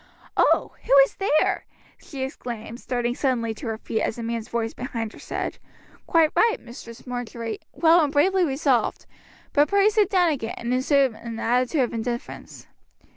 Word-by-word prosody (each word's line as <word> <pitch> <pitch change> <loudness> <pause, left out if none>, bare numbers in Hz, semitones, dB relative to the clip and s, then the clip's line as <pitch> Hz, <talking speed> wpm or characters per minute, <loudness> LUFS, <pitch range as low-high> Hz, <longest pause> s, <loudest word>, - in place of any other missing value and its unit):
Oh! - - +3
who - - +2
is - - -12
there?" 310 -6 +1 0.4
she 270 -3 -6
exclaimed, 240 -4 -6
starting 240 -2 -1
suddenly 245 -4 0
to 235 +3 -8
her 225 -1 -2
feet 220 0 -3
as - - -1
a 235 - -5
man's 230 -1 -4
voice 230 -1 -2
behind 230 -3 -5
her - - -13
said: - - -4 0.5
"Quite 325 -2 +4
right, 455 -1 +4
Mistress 235 -1 -11
Marjory, 240 -2 -5
well 335 0 +5
and 290 - 0
bravely 370 +6 +3
resolved; 270 -4 +1 0.5
but 290 0 +4
pray 400 +1 +4
sit 420 -2 +2
down 360 -5 +3
again, 235 -6 -3
and 235 +1 -2
assume 265 0 +3
an 230 +1 -8
attitude 250 +5 +1
of 245 - 0
indifference." 235 +1 -5
250 Hz, 170 wpm, -24 LUFS, 235-300 Hz, 0.5 s, well